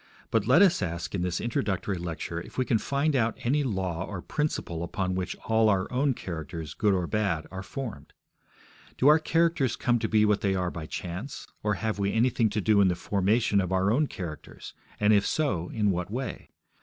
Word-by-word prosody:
But 110 -2 +1
let 140 +10 +7
us 185 - +4
ask 85 -2 -3
in 95 - -1
this 90 -1 -1
introductory 100 -4 -1
lecture 85 0 -4
if - - -12
we 130 - +1
can 115 -3 +2
find 140 +4 0
out 115 -3 +1
any 140 +5 +2
law 95 -7 -2
or 95 -1 -6
principle 150 - -2
upon 90 +2 -2
which 90 0 -3
all 110 -1 +3
our 95 -2 +2
own 135 +1 +2
characters, 80 -4 -6
good 105 -2 +2
or 90 -2 0
bad, 95 -5 -1
are 95 0 -5
formed. 120 +4 -7 0.9
Do 130 - +3
our 150 +2 +7
characters 165 -6 +1
come 120 -1 +1
to 110 - -2
be 110 -1 +4
what 105 -1 +2
they 95 -1 +1
are 90 -2 -1
by 80 -2 -6
chance, 90 - -6 0.2
or 105 -1 0
have 110 0 -2
we 100 0 0
anything 115 -1 +2
to 105 - -2
do 105 0 +4
in 100 - +5
the 90 - +1
formation 100 +3 +1
of 95 -1 -3
our 95 +2 +2
own 145 +6 +2
characters, 85 - -8 0.3
and 105 +1 +4
if 100 -1 +4
so, 95 - 0
in 105 -3 +1
what 90 +1 -2
way? 125 +5 -5
105 Hz, 205 wpm, -27 LUFS, 90-120 Hz, 0.9 s, let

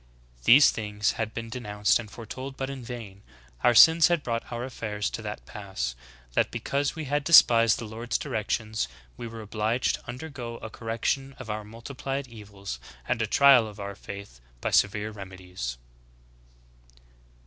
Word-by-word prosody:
These 140 +4 +8
things 105 -1 -1
had 110 -1 -3
been 115 0 -6
denounced 105 -4 +1
and 110 -3 -7
fore 115 +2 -10
told, 130 +4 -7
but 135 0 -3
in 135 -2 -7
vain. 115 -5 -8 0.4
Our 120 - +5
sins 160 +6 +8
had 170 -4 +1
brought 115 -1 -3
our 120 0 -3
affairs 105 -5 -3
to - - -5
that 105 -1 -6
pass, 95 -13 -4 0.4
that - - +2
because 140 +2 -1
we 160 -2 -5
had 145 +1 0
despised 115 -8 +7
the 115 - -6
Lord's 115 +2 -3
directions, 110 - -2 0.3
we 115 - -6
were 115 0 -8
obliged 110 +3 0
to - - -21
undergo 125 -3 -6
a 110 - -8
correction 120 +5 -2
of 120 -4 -6
our 105 0 -4
multiplied 130 +5 -5
evils 100 - -8 0.3
and 120 -2 0
a 110 - +1
trial 135 -1 +6
of 105 -1 -11
our 100 0 -5
faith 100 -9 -10 0.2
by - - -2
severe 105 +1 +2
remedies." 95 - -7
115 Hz, 165 wpm, -27 LUFS, 105-125 Hz, 0.4 s, These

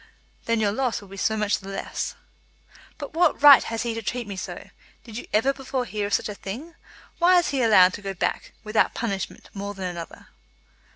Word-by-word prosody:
"Then 230 -1 +1
your 205 -2 +2
loss 250 +2 -1
will 200 - -14
be 195 - -10
so 220 +3 0
much 210 -1 +1
the 195 - -10
less." 195 - -4 0.8
"But 285 -1 -7
what 335 -1 +3
right 285 -3 +10
has 225 +1 -3
he 235 -1 -2
to 225 - -4
treat 240 +3 -3
me 200 -1 -6
so? 185 - -7 0.3
Did 225 -3 -11
you 235 - -6
ever 245 +6 +3
before 265 -2 -3
hear 210 -3 -3
of 205 - -5
such - - -1
a 210 - -5
thing? 240 - -7 0.5
Why 360 +1 +6
is 350 - +2
he 275 - -1
to 245 - +3
be - - +4
allowed 185 -4 +6
to - - -7
go 195 -1 -5
back, - - -2
without 215 0 +1
punishment, 200 -5 -4
more 200 0 -5
than 190 -1 -5
another?" 175 -2 -7
220 Hz, 225 wpm, -24 LUFS, 200-260 Hz, 0.8 s, right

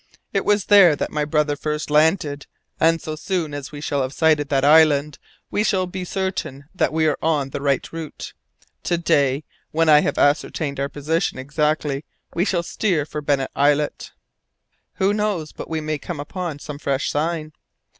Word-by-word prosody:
It - - 0
was 205 -2 +2
there 195 -7 +7
that - - -3
my 150 -1 -1
brother 150 -1 +1
first 150 0 -3
landed, 150 -1 +2 0.3
and 165 0 +3
so 155 -1 -5
soon 170 -2 -2
as 145 -1 -6
we 145 - -8
shall 145 -1 -1
have 130 +1 -3
sighted 155 -3 +2
that 135 -1 +2
island 150 -1 +4 0.3
we 210 - +1
shall 190 -3 +1
be 180 +1 -6
certain 185 -7 -4
that 185 - +1
we 160 0 +1
are 155 - +1
on 145 -4 0
the - - -4
right 140 -2 0
route. 165 -3 -7 0.5
To 175 - +1
day, 140 -4 +1 0.3
when 165 0 +1
I 150 -1 +8
have - - -1
ascertained 145 0 +1
our 140 0 -1
position 155 +3 -1
exactly, 145 +1 -1 0.3
we 175 - +1
shall 175 -4 0
steer 170 -5 0
for 150 0 -5
Bennet 140 -2 0
Islet." 145 +1 +1 0.8
"Who 195 +2 +2
knows 205 -7 -1
but - - -8
that - - -20
we 160 -1 -2
may 155 -1 -3
come 165 +1 -6
upon 165 +1 -5
some 145 0 -8
fresh 140 -1 -1
sign?" 155 0 -2
150 Hz, 185 wpm, -22 LUFS, 145-165 Hz, 0.8 s, I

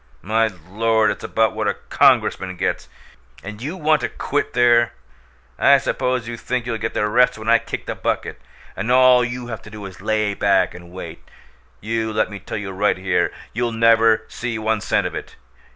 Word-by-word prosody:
"My 110 +3 +2 0.2
Lord! 110 +2 +2
It's 100 - -7
about 110 0 +1
what 110 -1 -2
a 100 - 0
Congressman 95 -1 +2
gets, 95 - -2 0.5
and 105 +2 -8
you 155 +9 -5
want 155 -2 +2
to - - -2
quit - - -2
there! 120 -1 +4 0.7
I - - +6
suppose 125 -2 -1
you 120 0 -5
think 125 +1 -3
you'll 115 -2 -3
get 110 +1 -4
the 105 - +1
rest 125 +3 +3
when 110 0 -9
I 115 0 +5
kick - - -6
the - - -3
bucket, - - -3 0.3
and 110 +5 -2
all 125 -1 +6
you 120 +1 -4
have 115 -3 -6
to - - -13
do 105 -1 -9
is 95 -1 -10
lay 110 -1 0
back 100 -1 +2
and 85 -1 -12
wait! 95 - -8 0.6
You 110 +1 -2
let 105 - 0
me 100 - -7
tell 95 - -6
you 100 -2 -5
right 100 +2 +1
here, 90 -2 0 0.2
you'll 120 0 -1
never 115 -1 +4
see 120 -2 -4
one 110 0 -1
cent - - 0
of - - -3
it. - - -7
110 Hz, 200 wpm, -21 LUFS, 105-120 Hz, 0.7 s, I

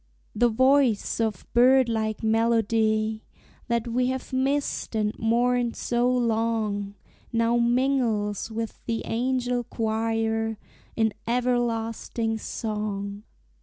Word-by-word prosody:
The 240 +3 +3
voice 260 -2 +3
of 220 -4 -1
bird 255 +1 +5
like 220 -1 -2
melody 220 -1 +1 0.4
That 235 -1 0
we 250 +2 +1
have 260 0 -4
missed 270 -2 -1
and 210 -1 0
mourned 240 +1 +1
so 240 +1 0
long 220 -4 0 0.4
Now 230 +1 +2
mingles 235 -4 +1
with 225 0 -5
the 230 -1 -1
angel 245 +1 0
choir 225 -1 -1 0.4
In 220 -2 +1
everlasting 230 -2 -1
song. 210 -2 -4
230 Hz, 100 wpm, -26 LUFS, 220-245 Hz, 0.4 s, bird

